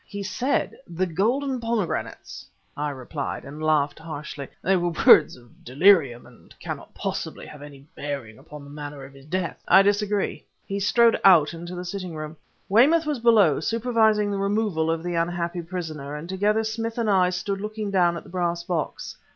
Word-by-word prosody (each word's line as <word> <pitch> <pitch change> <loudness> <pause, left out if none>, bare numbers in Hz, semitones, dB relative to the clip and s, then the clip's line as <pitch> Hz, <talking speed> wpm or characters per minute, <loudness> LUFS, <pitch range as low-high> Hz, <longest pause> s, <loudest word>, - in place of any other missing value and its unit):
"He 200 -1 -6
said 255 +7 -1
'the 175 +1 -1
golden 245 - 0
pomegranates,'" 230 -6 -3 0.3
I 150 0 -2
replied, 140 +1 -5
and 150 +3 -9
laughed 155 -2 +1
harshly. 150 -3 -7 0.2
"They 190 +2 +3
were 175 -1 0
words - - +7
of 120 -2 -21
delirium 140 -3 +3
and - - -18
cannot - - -7
possibly - - -4
have 150 - -12
any 140 -1 -12
bearing 135 -7 -6
upon 150 -1 -12
the 140 - -12
manner 145 -1 -8
of 135 - -14
his 135 +1 -16
death." 180 +1 -3
"I 190 +2 +7
disagree." 205 0 0 0.2
He 200 0 -3
strode 230 +3 +4
out 170 -5 +6
into 175 +2 -7
the 180 0 -6
sitting 180 -2 -5
room. 155 0 -6 0.3
Weymouth 290 +11 +4
was 300 -4 -2
below, 215 -10 +4
supervising 220 +1 +1
the 200 - -2
removal 200 -5 0
of 165 0 -1
the 175 0 -3
unhappy 170 +1 -2
prisoner, 160 -5 -6
and 150 +3 -7
together 205 +4 +1
Smith 225 +1 -4
and 230 -2 0
I 185 -3 +4
stood 195 +2 -3
looking 215 -1 -4
down 175 -3 +2
at - - -8
the - - -15
brass 175 -1 -1
box. 170 -3 -4
175 Hz, 180 wpm, -24 LUFS, 150-205 Hz, 0.3 s, words